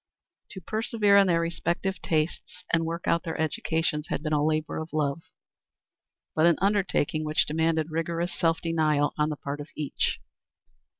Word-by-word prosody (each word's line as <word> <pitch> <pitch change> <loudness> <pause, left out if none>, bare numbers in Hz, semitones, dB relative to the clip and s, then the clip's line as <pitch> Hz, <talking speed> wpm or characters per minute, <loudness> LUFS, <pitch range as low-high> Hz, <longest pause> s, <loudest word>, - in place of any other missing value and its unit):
To 190 - -8
persevere 215 +1 +1
in 200 -1 +6
their 170 -2 +3
respective 170 +3 -2
tastes 160 +3 -2
and 165 0 +3
work 170 +1 -4
out 170 - +3
their 165 -2 -5
educations 160 0 -1
had - - -3
been 155 -1 -1
a 145 -1 +2
labor 155 0 0
of 160 0 -7
love, 150 0 0 1.1
but 160 +2 +4
an 170 - +4
undertaking 190 -6 +1
which 155 0 +2
demanded 160 0 0
rigorous 170 +2 -2
self 165 -1 +1
denial 155 -3 +1
on 150 0 +2
the 150 - -4
part 145 +1 -5
of 145 - -9
each. 150 -3 -1
160 Hz, 165 wpm, -27 LUFS, 155-170 Hz, 1.1 s, in